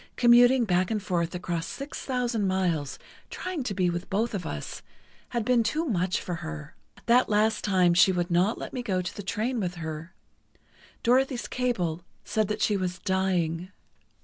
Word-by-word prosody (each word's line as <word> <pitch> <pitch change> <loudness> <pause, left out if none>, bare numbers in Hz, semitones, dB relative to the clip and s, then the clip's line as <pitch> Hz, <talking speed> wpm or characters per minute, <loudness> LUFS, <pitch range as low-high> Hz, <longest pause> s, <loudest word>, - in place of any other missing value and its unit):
Commuting 245 +1 +6
back 180 -2 +1
and 220 - 0
forth 175 -4 -1
across 175 -2 -3
six 280 +1 -6
thousand 240 -5 0
miles, 175 -7 0 0.3
trying 365 -4 -4
to 225 -6 -3
be 185 -2 +2
with 175 +1 -3
both 220 +4 0
of 185 -5 -3
us, 75 - -6 0.5
had 235 -3 -2
been 250 -1 +4
too 305 +9 0
much 190 - 0
for 180 - -5
her. 75 - -7 0.3
That 245 +2 +4
last 215 +1 +2
time 185 -3 +3
she 185 +3 +6
would 175 -1 -1
not 180 +6 +2
let - - -7
me 255 - -2
go 190 -6 -1
to 175 - -5
the - - -5
train 225 +5 -2
with 180 -3 -2
her. 160 +1 -6 0.9
Dorothy's 255 +1 +2
cable 185 -10 -1 0.2
said 215 -2 0
that 210 - -2
she 210 - +2
was 180 -2 -2
dying. 180 -2 0
190 Hz, 175 wpm, -27 LUFS, 175-235 Hz, 0.9 s, Commuting